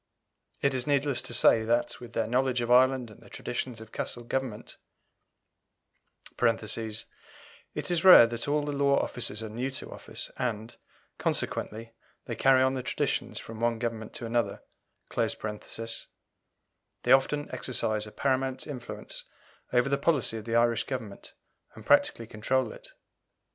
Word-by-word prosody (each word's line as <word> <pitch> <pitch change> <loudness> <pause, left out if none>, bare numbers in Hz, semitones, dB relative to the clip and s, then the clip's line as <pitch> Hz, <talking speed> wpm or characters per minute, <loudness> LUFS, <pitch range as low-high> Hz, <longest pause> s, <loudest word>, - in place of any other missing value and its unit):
It 140 -1 +3
is 130 0 0
needless 140 -2 +1
to - - -8
say 115 -1 +5
that, 120 +2 0
with 120 -1 -11
their 115 - 0
knowledge 125 +2 +1
of 120 0 -1
Ireland 130 -1 +4
and 105 - -16
the - - -16
traditions 125 -3 -4
of 110 0 -12
Castle 120 - -4
government 125 -2 -4 1.6
(it 115 -2 +1 0.9
is 175 -2 0
rare 185 -10 +11
that 115 +2 -3
all 145 +1 +1
the 145 - -2
law 140 -1 +3
officers 115 -3 -2
are 110 - -5
new 120 +5 -3
to 135 - -5
office, - - -6
and, 115 -2 -3 0.4
consequently, 115 +2 -2 0.3
they - - -4
carry 130 -1 +5
on 130 0 +2
the 130 - -2
traditions - - -1
from 115 -1 -9
one 120 0 +1
Government 115 -2 -4
to 120 - -5
another), 115 -3 -1 0.5
they - - +2 1.8
often 145 +2 +3
exercise 110 -4 -1
a - - -10
paramount 130 0 0
influence 135 -6 -7 0.5
over 125 +1 +3
the 140 0 +1
policy 140 -6 +2
of 110 - -8
the 115 0 -1
Irish 115 -1 +3
Government, 115 -7 -6 0.4
and - - -12
practically 115 - +3
control 115 +5 -1
it. - - -12
120 Hz, 150 wpm, -29 LUFS, 115-135 Hz, 1.8 s, rare